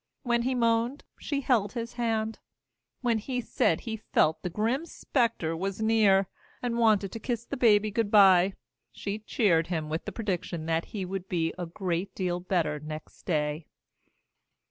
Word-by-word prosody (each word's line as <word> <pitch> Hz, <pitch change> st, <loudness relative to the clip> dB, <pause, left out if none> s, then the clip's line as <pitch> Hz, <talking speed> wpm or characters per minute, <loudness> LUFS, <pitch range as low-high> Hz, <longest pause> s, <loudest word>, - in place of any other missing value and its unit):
When 240 Hz, -2 st, +1 dB
he 255 Hz, +2 st, 0 dB
moaned, 235 Hz, +3 st, +1 dB, 0.2 s
she 285 Hz, -2 st, -2 dB
held 220 Hz, -7 st, +1 dB
his 235 Hz, -1 st, -4 dB
hand. 225 Hz, -2 st, -1 dB, 0.6 s
When 235 Hz, -3 st, +1 dB
he 250 Hz, +3 st, -3 dB
said 165 Hz, -7 st, +1 dB
he 225 Hz, -2 st, -4 dB
felt 160 Hz, -6 st, +1 dB
that 180 Hz, -, -3 dB
the -, -, -18 dB
grim 245 Hz, +10 st, 0 dB
specter 230 Hz, -, -1 dB
was 195 Hz, +4 st, -3 dB
near, 215 Hz, -3 st, +4 dB, 0.3 s
and 235 Hz, -1 st, -2 dB
wanted 210 Hz, -4 st, +3 dB
to 225 Hz, -, -6 dB
kiss 235 Hz, +1 st, -3 dB
the 280 Hz, -, -4 dB
baby 215 Hz, -4 st, +4 dB
good 225 Hz, 0 st, 0 dB
by, 190 Hz, -2 st, +6 dB, 0.4 s
she 205 Hz, +1 st, -4 dB
cheered 190 Hz, -6 st, +2 dB
him 160 Hz, -3 st, -2 dB
with 160 Hz, +2 st, -3 dB
the -, -, -4 dB
prediction 180 Hz, -6 st, -3 dB
that 165 Hz, 0 st, 0 dB
he 195 Hz, -3 st, -5 dB
would 190 Hz, 0 st, -5 dB
be 165 Hz, -2 st, 0 dB
a 175 Hz, -1 st, -5 dB
great 180 Hz, +1 st, -3 dB
deal 180 Hz, -2 st, -1 dB
better 170 Hz, -5 st, 0 dB
next 155 Hz, +1 st, -9 dB
day. 150 Hz, -2 st, -1 dB
205 Hz, 170 wpm, -28 LUFS, 175-230 Hz, 0.6 s, by